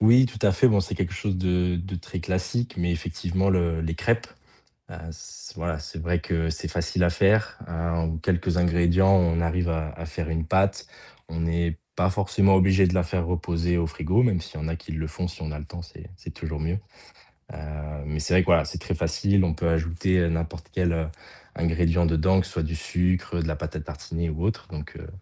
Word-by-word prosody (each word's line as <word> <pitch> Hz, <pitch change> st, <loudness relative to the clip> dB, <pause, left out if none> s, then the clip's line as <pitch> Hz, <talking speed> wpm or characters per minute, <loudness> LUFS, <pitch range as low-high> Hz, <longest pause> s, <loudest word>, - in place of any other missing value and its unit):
Oui, 120 Hz, +4 st, +7 dB
tout 110 Hz, -4 st, -5 dB
à -, -, +6 dB
fait. 115 Hz, +8 st, +5 dB
Bon, 105 Hz, -4 st, +4 dB
c'est 95 Hz, -, -3 dB
quelque 95 Hz, -1 st, -1 dB
chose 95 Hz, 0 st, -1 dB
de 90 Hz, -1 st, +1 dB
de 95 Hz, +2 st, -5 dB
très 90 Hz, +1 st, -5 dB
classique 95 Hz, +8 st, -1 dB
mais 85 Hz, -1 st, 0 dB
effectivement 90 Hz, +3 st, -1 dB
le 85 Hz, -3 st, +2 dB
les 80 Hz, 0 st, -2 dB
crêpes, 115 Hz, +6 st, +1 dB, 0.6 s
heu, -, -, -8 dB
s 80 Hz, -, -10 dB
voilà, 80 Hz, -1 st, -3 dB
c'est 80 Hz, +1 st, -7 dB
vrai 85 Hz, +2 st, 0 dB
que 80 Hz, 0 st, -1 dB
c'est 80 Hz, -, -3 dB
facile 85 Hz, +2 st, 0 dB
à 85 Hz, -, +4 dB
faire. 100 Hz, +5 st, +3 dB
Hem, 85 Hz, 0 st, -2 dB, 0.2 s
en -, -, -3 dB
quelques 85 Hz, +1 st, 0 dB
ingrédients, 85 Hz, +2 st, +4 dB
on 85 Hz, -3 st, +3 dB
arrive 85 Hz, +1 st, 0 dB
à 80 Hz, -1 st, -1 dB
à 85 Hz, +2 st, -8 dB
faire 80 Hz, +1 st, -4 dB
une 80 Hz, 0 st, -1 dB
pâte. 95 Hz, +3 st, +1 dB, 0.4 s
On 80 Hz, 0 st, -4 dB
n'est 85 Hz, 0 st, 0 dB, 0.2 s
pas 90 Hz, +1 st, +3 dB
forcément 100 Hz, 0 st, +3 dB
obligé 95 Hz, 0 st, +5 dB
de 90 Hz, -, 0 dB
la 90 Hz, -1 st, +3 dB
faire 85 Hz, 0 st, -1 dB
reposer 85 Hz, 0 st, 0 dB
au 85 Hz, -, +1 dB
frigo, 85 Hz, +8 st, +1 dB
même 105 Hz, -8 st, +3 dB
s'il 80 Hz, -1 st, -8 dB
y -, -, -4 dB
en -, -, -2 dB
a 80 Hz, -, -2 dB
qui 80 Hz, -, -10 dB
le 80 Hz, 0 st, -3 dB
font, 90 Hz, +4 st, -3 dB
si 90 Hz, +2 st, -9 dB
on 80 Hz, -1 st, -4 dB
a 75 Hz, -, -5 dB
le 75 Hz, -, -7 dB
temps, 85 Hz, -, -8 dB
c'est 90 Hz, +3 st, -12 dB
c'est -, -, -9 dB
toujours 80 Hz, -2 st, -5 dB
mieux. 85 Hz, +6 st, -1 dB, 0.7 s
Heu -, -, -9 dB, 0.5 s
mais 75 Hz, +1 st, -3 dB
c'est 90 Hz, -, -2 dB
vrai 90 Hz, -, +6 dB
que -, -, -5 dB
voilà, 85 Hz, -4 st, +5 dB
c'est -, -, -5 dB
très -, -, -3 dB
facile, 100 Hz, -1 st, +2 dB
on 80 Hz, -3 st, +1 dB
peut 85 Hz, +2 st, -1 dB
ajouter, 85 Hz, +3 st, +1 dB
heu, 85 Hz, -1 st, +3 dB
n'importe 85 Hz, 0 st, -3 dB
quel, 90 Hz, -2 st, +1 dB
heu, 80 Hz, -1 st, -1 dB, 0.5 s
ingrédient 85 Hz, +1 st, +2 dB
dedans, 90 Hz, +4 st, +3 dB
ce -, -, -7 dB
soit 85 Hz, -, -2 dB
du 80 Hz, +1 st, -2 dB
sucre, 90 Hz, +1 st, 0 dB
de 80 Hz, -, -2 dB
la 75 Hz, -, -2 dB
pâte -, -, -5 dB
à -, -, -3 dB
tartiner 75 Hz, +3 st, -4 dB
ou 80 Hz, +2 st, -4 dB
autre. 110 Hz, 0 st, -1 dB
Donc 75 Hz, 0 st, -8 dB
heu, 85 Hz, -, -9 dB
85 Hz, 230 wpm, -26 LUFS, 80-95 Hz, 0.7 s, Oui